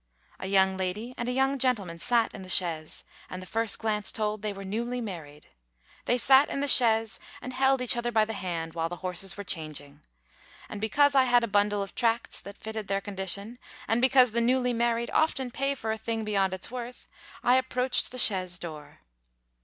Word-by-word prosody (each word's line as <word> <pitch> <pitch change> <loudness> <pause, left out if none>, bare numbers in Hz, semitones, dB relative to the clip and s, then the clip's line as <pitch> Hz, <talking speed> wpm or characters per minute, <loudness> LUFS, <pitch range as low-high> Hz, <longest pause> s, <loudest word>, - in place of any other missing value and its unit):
A 190 - -5
young 190 -1 +3
lady 200 +6 -4
and 240 0 -3
a - - 0
young 270 +2 +1
gentleman 205 -10 0
sat 230 +5 +1
in - - -9
the 185 - -9
chaise, 165 -4 0 0.3
and 185 - -6
the 185 - -9
first 225 +2 0
glance 210 -3 -2
told 215 -1 -2
they 215 - -2
were 195 0 -8
newly 235 +5 -3
married. 165 -10 -8 0.6
They 245 - +2
sat 265 +3 +5
in - - -3
the 285 - -1
chaise, 225 -4 +3 0.2
and 255 - -8
held 265 0 +2
each 245 - +6
other 240 0 -2
by 220 -2 +3
the 225 - -5
hand, 170 -5 -4
while 165 0 -2
the 175 - -5
horses 185 +1 0
were 205 - -5
changing. 150 -5 -5 0.7
And 205 - -8
because 285 +6 +3
I 265 -2 +5
had 245 -1 +3
a - - 0
bundle 205 0 +1
of 195 - -9
tracts 230 -1 0
that 200 0 -11
fitted 220 -1 -6
their 195 0 0
condition, 200 +4 -3 0.3
and 225 +2 +1
because 255 -2 +5
the 235 +2 0
newly 250 +1 +1
married 235 0 0
often 270 -5 0
pay 275 +3 -1
for 220 -4 -4
a 220 - -3
thing 225 0 -3
beyond 195 -3 0
its 185 - -4
worth, 245 0 -7 0.4
I 250 +1 +5
approached 255 0 0
the 255 - -8
chaise 185 -6 +2
door. 155 -4 -10
220 Hz, 205 wpm, -27 LUFS, 190-245 Hz, 0.7 s, each